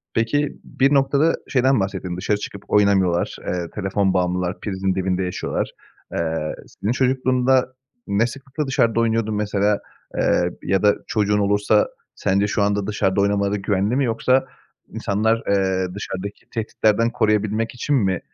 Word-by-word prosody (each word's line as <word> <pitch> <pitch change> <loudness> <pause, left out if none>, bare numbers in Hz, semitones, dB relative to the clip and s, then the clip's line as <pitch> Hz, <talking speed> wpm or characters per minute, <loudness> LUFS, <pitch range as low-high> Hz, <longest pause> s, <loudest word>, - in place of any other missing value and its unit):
Peki, 140 +6 0
bir 135 +2 +1
noktada 140 +3 +3
şeyden 130 -1 +3
bahsettin, 95 -2 -3
dışarı 105 +3 0
çıkıp 100 -1 -8
oynamıyorlar, 95 -4 +2
eee, 90 -2 -2
telefon 95 -1 0
bağımlılar, 90 0 0
prizin 95 -2 -1
dibinde 95 0 0
yaşıyorlar. 90 0 -2 0.4
Eee, 80 -2 -2
senin 105 - -3
çocukluğunda 130 0 +2 0.3
ne 100 +4 +2
sıklıkla 135 +4 -5
dışarıda 115 -3 +2
oynuyordun 115 -1 +1
mesela, 105 0 +1 0.4
eee, 90 0 +2
ya 95 +1 +1
da 105 -1 +5
çocuğun 105 -1 +1
olursa 105 +1 +3 0.3
sence 100 +1 +1
şu 105 0 0
anda 100 0 +1
dışarıda 100 -2 +1
oynamaları 100 0 +1
güvenli 100 +3 0
mi 135 0 +2
yoksa 130 +3 +2 0.4
insanlar, 110 +3 0
eee, 95 -2 +1
dışarıdaki 100 0 -6
tehditlerden 110 0 +1
koruyabilmek 105 +1 0
için 145 +4 0
mi 95 -8 +1
105 Hz, 135 wpm, -22 LUFS, 95-115 Hz, 0.4 s, da